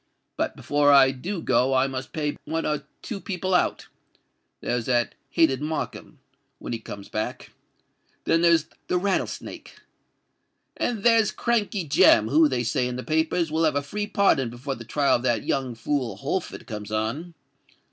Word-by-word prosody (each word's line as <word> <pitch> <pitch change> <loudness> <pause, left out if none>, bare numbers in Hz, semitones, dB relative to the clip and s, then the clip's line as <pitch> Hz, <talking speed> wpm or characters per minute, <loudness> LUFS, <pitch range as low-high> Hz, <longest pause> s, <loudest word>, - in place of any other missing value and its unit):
But - - -2
before 145 0 +2
I 135 -1 +7
do 170 +8 -5
go 130 +1 +2
I 130 +1 +4
must 130 -1 -5
pay 150 -2 -2
one 165 0 -2
or 150 -1 -2 0.2
two 215 -5 -5
people 185 -1 -3
out:—there's 120 -8 -3
that 120 -2 +1 0.2
hated 140 -5 +2
Markham—when 155 -5 -7
he 115 - -3
comes 105 -3 -9
back; 110 - -4 0.7
then 165 - +2
there's 170 -2 +4 0.2
the 180 - +1
Rattlesnake; 195 +1 -3 1.0
and 225 -4 -2
there's 230 -2 +5
Crankey 210 -6 -1
Jem, 110 -5 +5
who, 155 +3 +5
they 125 -3 -1
say 125 +1 0
in 125 - -4
the 125 - -5
papers, 160 +1 0
will 160 +1 +1
have 155 -3 +2
a 145 - 0
free 205 +8 -4
pardon 165 - +2
before 125 +4 -5
the 115 -3 -9
trial 140 +4 +2
of - - -8
that 120 -4 0
young 130 -3 -1
fool 125 -3 -2
Holford 145 - -4
comes 105 -2 -7
on. 115 +11 -3
145 Hz, 160 wpm, -25 LUFS, 125-170 Hz, 1.0 s, I